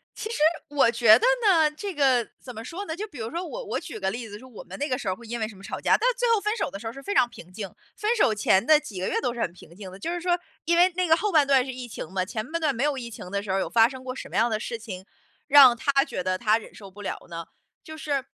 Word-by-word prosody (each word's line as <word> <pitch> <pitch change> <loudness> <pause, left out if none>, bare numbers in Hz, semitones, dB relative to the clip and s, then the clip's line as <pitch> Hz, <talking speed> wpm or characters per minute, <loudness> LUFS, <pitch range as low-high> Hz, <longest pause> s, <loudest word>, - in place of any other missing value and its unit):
其 435 - -5
实 470 - -3 0.3
我 280 -5 +3
觉 230 -2 +7
得 - - 0 0.2
呢， 320 -6 +5
这 400 +6 -5
个， 260 -5 +2
怎 250 - -10
么 225 0 -8
说 355 - -6
呢。 320 - -4
就 420 +5 -5
比 300 - -13
如 225 +1 -5
说 345 +2 -3
我 - - -6
我 - - -2
举 290 - -8
个 190 0 -1
例 230 -1 -6
子 205 - -8
说 260 - -14
我 240 -5 -11
们 - - -10
那 290 +1 -2
个 255 - 0
时 235 - -6
候 185 - 0
儿 - - -24
会 235 - -13
因 235 +1 -4
为 220 - -1
什 215 - -12
么 195 - -15
吵 - - -6
架， - - +4
但 470 - +1
最 - - 0
后 - - +1
分 420 +2 -1
手 - - -2
的 - - -7
时 225 - -11
候 225 - -3
儿 - - -15
是 275 - -10
非 405 +8 -4
常 245 - +5
平 180 -7 -14
静。 200 +1 -5 0.3
分 435 +3 0
手 410 - +3
前 195 -2 +3
的 305 +4 +6
几 215 -11 -8
个 185 - -1
月 - - 0
都 245 -3 -1
是 240 - -5
很 170 - 0
平 170 -1 -16
静 190 -1 -9
的， 190 - -10
就 330 +12 -4
是 350 - -4
说， 350 0 +1 0.3
因 340 +1 +2
为 360 +1 +5
那 365 -1 0
个 320 0 +5
后 420 +1 -1
半 300 -4 +4
段 270 -2 +4
是 260 - -5
疫 250 -1 -7
情 215 - -7
嘛， 185 -1 0
前 215 +3 -4
半 335 0 -2
段 290 -4 +1
没 240 - -1
有 295 -1 +1
疫 240 -3 -6
情 185 -5 -9
的 200 - -1
时 205 - -10
候 190 - +1
儿 - - +1
有 - - -1
发 225 0 +4
生 260 -1 -10
过 255 -1 -5
什 - - -8
么 - - -9
样 235 +1 +3
的 215 - 0
事 235 +1 -4
情， 205 -5 -8 0.4
让 275 -4 +8
他 275 +3 +2
觉 185 - -4
得 185 0 0
他 220 0 +2
忍 220 - -13
受 200 -2 -12
不 205 +2 -12
了 205 - -4
呢？ 165 -1 -7 0.4
就 315 0 -10
是 290 -4 -2
250 Hz, 360 characters per minute, -25 LUFS, 215-315 Hz, 0.4 s, 让